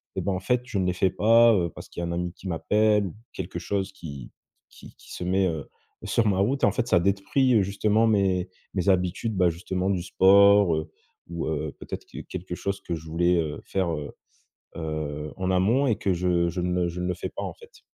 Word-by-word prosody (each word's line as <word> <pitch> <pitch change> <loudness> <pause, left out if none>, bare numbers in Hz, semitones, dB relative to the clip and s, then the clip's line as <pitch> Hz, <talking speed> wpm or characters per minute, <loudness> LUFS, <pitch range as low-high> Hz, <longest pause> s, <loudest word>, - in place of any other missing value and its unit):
et - - -1
bah 100 - -1
en 90 - -2
fait, 125 +5 +1
je 120 -5 -3
ne 95 - +1
les 90 - +1
fais 95 +1 +2
pas, 115 +4 +5
heu, 85 -3 +1
parce - - -10
qu'il - - -6
y - - -3
a - - -2
un - - -3
ami 85 0 -3
qui 95 - -11
m'appelle, 105 +4 +2
ou 85 - -9 0.2
quelque 95 -1 -5
chose 100 -1 -2
qui 70 -9 -9 0.4
qui - - -15
qui - - -13
se - - -5
met, 95 +1 +2
heu, 80 -4 -4 0.3
sur 115 - +1
ma 95 -2 +1
route 130 +8 0
et - - +8
en 100 - +3
fait, 120 +4 -2
ça 90 - +4
détruit, 100 +8 +1
heu, 110 - +5
justement 105 +3 +2
mes 95 -4 +1 0.2
mes 95 0 0
habitudes 95 +3 0
bah 90 -1 +4
justement 90 +3 -3
du 95 -3 -1
sport, 100 -1 +5
heu, 80 +1 -4 0.4
ou, 85 -2 -4
heu, 75 -1 -2
peut-être - - -7
que - - -9
quelque 95 -1 -6
chose 100 +2 -3
que 85 - -3
je 80 0 -9
voulais, 85 +2 +2
heu, 80 -3 -2
faire, 95 -3 -1
heu 75 -2 -5 0.7
heu, 75 -2 -4
en 95 0 -2
amont 105 +10 +3
et 115 - +2
que 95 - 0
je 85 -1 +1
je 90 +2 -3
ne 90 0 0
le - - 0
je 85 +1 -5
ne 90 - -2
le 90 - 0
fais 90 - -5
pas - - -6
en - - -4
fait. 465 +1 -17
95 Hz, 245 wpm, -26 LUFS, 85-100 Hz, 0.7 s, et